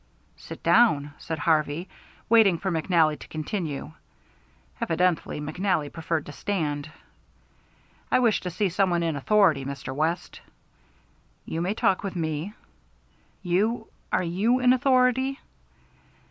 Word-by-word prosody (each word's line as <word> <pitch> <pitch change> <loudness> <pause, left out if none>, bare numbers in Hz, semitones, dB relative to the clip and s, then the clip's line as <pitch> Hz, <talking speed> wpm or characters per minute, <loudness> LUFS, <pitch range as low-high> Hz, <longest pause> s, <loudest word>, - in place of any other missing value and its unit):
"Sit - - -10
down," 150 -12 +4
said 160 -2 -4
Harvey, 155 +2 0 0.4
waiting 220 -6 +5
for 190 +3 -2
McNally 160 -2 +2
to - - -11
continue. 155 -2 -4 0.9
Evidently 175 -2 0
McNally 155 0 -1
preferred 165 -1 -2
to - - -8
stand. 150 -4 -3 1.2
"I - - +5
wish 235 -4 +2
to 180 - -4
see 190 +4 0
some 190 +2 +1
one 170 -1 +1
in 165 -2 -1
authority, 160 -2 +3
Mr. 135 -1 -6
West." 160 +5 -2 1.0
"You 165 - -3
may 190 +4 -1
talk 195 -4 +2
with 195 -2 -5
me." 160 +3 -3 0.9
"You 215 +6 0 0.2
are 185 - +1
you 200 +9 +1
in 250 0 +5
authority?" 260 +1 +2
175 Hz, 125 wpm, -26 LUFS, 155-205 Hz, 1.2 s, waiting